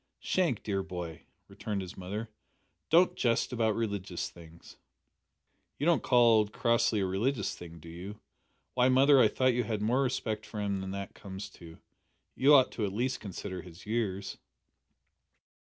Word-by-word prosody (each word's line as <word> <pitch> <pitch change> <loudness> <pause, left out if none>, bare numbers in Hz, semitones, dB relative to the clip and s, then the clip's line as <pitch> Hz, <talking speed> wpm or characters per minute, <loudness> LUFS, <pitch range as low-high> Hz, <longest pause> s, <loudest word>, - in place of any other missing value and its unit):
"Shank, 170 - 0
dear 100 -2 -1
boy," 90 -4 -7 0.2
returned 100 -3 -4
his 90 - -9
mother, 105 +5 -5 0.6
"don't 175 +3 +5
jest 120 +1 +1
about 110 -3 +1
religious 100 -5 -3
things." 85 -1 -15 1.0
"You 145 - -2
don't 170 -2 +4
call 120 -3 +5
old 105 -1 +1
Crossley 115 -3 +2
a - - +1
religious 100 +4 -1
thing, 85 -1 -10
do 80 - -13
you? 90 +5 -8 0.5
Why, 125 0 +3
mother, 135 +2 +6
I 115 - +7
thought 130 +4 +2
you 120 +1 +1
had 110 -3 -2
more 125 +5 +2
respect 110 -5 -1
for 110 - -7
him 100 -2 -1
than 95 - -5
that 100 0 -5
comes 95 0 -8
to; 85 -1 -13 0.6
you 145 +3 +6
ought 130 -3 +3
at 105 -3 0
least 125 +5 -1
to - - -25
consider 95 -2 -6
his 85 +1 -13
years!" 105 -3 -2
105 Hz, 165 wpm, -30 LUFS, 95-120 Hz, 1.0 s, I